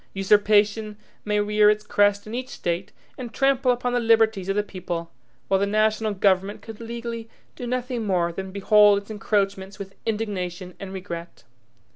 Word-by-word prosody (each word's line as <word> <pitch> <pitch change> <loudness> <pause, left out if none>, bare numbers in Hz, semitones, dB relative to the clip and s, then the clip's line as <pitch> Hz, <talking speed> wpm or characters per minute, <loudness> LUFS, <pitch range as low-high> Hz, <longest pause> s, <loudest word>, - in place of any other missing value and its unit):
Usurpation 210 +2 +3 0.3
may 210 0 0
rear 210 0 +4
its 210 0 +1
crest 205 0 +2
in 215 - -8
each 255 +1 -4
State, 175 +2 -3 0.3
and 245 -3 -6
trample 270 -1 +2
upon 245 0 -1
the 245 - +2
liberties 225 -4 +3
of 195 - +1
the 210 - +1
people, 175 -4 -5 0.4
while 195 - +2
the 200 - +1
national 215 0 +1
government 195 +1 +1
could 225 -2 -9
legally 230 0 -6 0.3
do 245 - -6
nothing 250 -1 -2
more 175 -3 +1
than 190 +1 -6
behold 205 +1 +5
its 200 +2 -6
encroachments 195 -2 -1
with 195 -1 -8
indignation 185 -5 -3
and 195 -1 -7
regret. 175 -3 -7
210 Hz, 165 wpm, -24 LUFS, 195-225 Hz, 0.4 s, behold